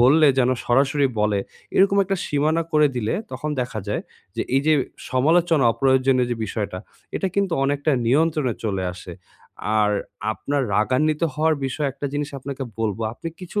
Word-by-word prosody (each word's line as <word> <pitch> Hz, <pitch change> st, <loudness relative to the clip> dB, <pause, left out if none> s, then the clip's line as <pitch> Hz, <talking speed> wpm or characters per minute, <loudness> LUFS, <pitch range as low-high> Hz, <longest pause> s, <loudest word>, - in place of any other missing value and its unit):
বললে 150 Hz, +6 st, +6 dB
যেন 125 Hz, -1 st, +4 dB
সরাসরি 140 Hz, +3 st, +3 dB
বলে। 105 Hz, -1 st, +2 dB, 0.4 s
এরকম 195 Hz, +1 st, +5 dB
একটা 195 Hz, 0 st, -1 dB
সীমানা 155 Hz, +3 st, +1 dB
করে 150 Hz, -1 st, +5 dB
দিলে 110 Hz, -2 st, -1 dB, 0.2 s
তখন 135 Hz, +4 st, -4 dB
দেখা 120 Hz, -3 st, -3 dB
যায় 105 Hz, -, -1 dB, 0.3 s
যে -, -, 0 dB
এইযে 155 Hz, +3 st, +3 dB, 0.4 s
সমালোচনা 160 Hz, +2 st, +3 dB
অপ্রয়োজনীয় 130 Hz, -1 st, +3 dB
যে 120 Hz, -, -1 dB
বিষয়টা, 100 Hz, -3 st, -3 dB, 0.4 s
এটা 190 Hz, -, -1 dB
কিন্তু 200 Hz, -3 st, +1 dB
অনেকটা 145 Hz, +2 st, +1 dB
নিয়ন্ত্রণে 150 Hz, -2 st, +2 dB
চলে 95 Hz, -3 st, -1 dB
আসে। 90 Hz, 0 st, -9 dB, 0.7 s
আর 105 Hz, 0 st, +3 dB, 0.4 s
আপনার 140 Hz, +4 st, -2 dB
রাগান্বিত 150 Hz, +8 st, +1 dB
হওয়ার 155 Hz, +1 st, +2 dB
বিষয়ে 140 Hz, +2 st, -1 dB
একটা 145 Hz, -, -5 dB
জিনিস 145 Hz, 0 st, -2 dB
আপনাকে 135 Hz, +1 st, -6 dB, 0.2 s
বলবো, 110 Hz, 0 st, -1 dB
আপনি 165 Hz, +7 st, -6 dB
কিছু 185 Hz, +3 st, -3 dB
140 Hz, 155 wpm, -23 LUFS, 120-155 Hz, 0.7 s, বললে